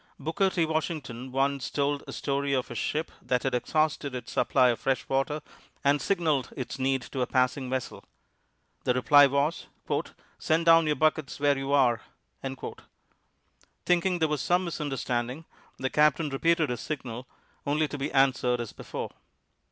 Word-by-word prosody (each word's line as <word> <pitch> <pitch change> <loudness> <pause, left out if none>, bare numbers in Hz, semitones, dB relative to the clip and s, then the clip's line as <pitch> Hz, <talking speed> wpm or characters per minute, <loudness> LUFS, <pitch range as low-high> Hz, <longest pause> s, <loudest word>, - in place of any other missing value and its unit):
Booker 190 +5 +1
T. 175 -3 +1
Washington 150 -6 -3
once 135 -1 0
told 145 0 0
a - - -6
story 140 0 -1
of 130 -2 -1
a - - -3
ship 150 +7 -2
that 125 -1 0
had 135 - 0
exhausted 145 +2 0
its 120 -2 -6
supply 125 - +3
of 120 - 0
fresh 135 -1 -1
water 135 +3 -1 0.4
and 140 0 +3
signaled 160 -8 0
its 130 0 -5
need 130 0 +1
to 135 - -5
a 125 - +1
passing 130 +1 +1
vessel. 130 -1 -4 0.8
The 125 - +1
reply 145 +3 +7
was, 140 +4 0 0.7
"Send 160 +1 +1
down 165 -1 +6
your 150 - +2
buckets 155 -3 0
where 145 0 +3
you 135 0 -3
are." 125 -5 +3 1.8
Thinking 180 +1 +2
there 160 -2 +2
was 150 -3 -1
some 180 +6 +2
misunderstanding, 135 -3 -3 0.3
the 130 - -2
captain 150 +1 +3
repeated 160 +2 +2
his 120 - -3
signal, 125 -4 -5 0.4
only 150 +2 +2
to 145 - -6
be 140 +3 -2
answered 130 -2 +3
as 120 -2 -5
before. - - -6
140 Hz, 160 wpm, -28 LUFS, 130-155 Hz, 1.8 s, reply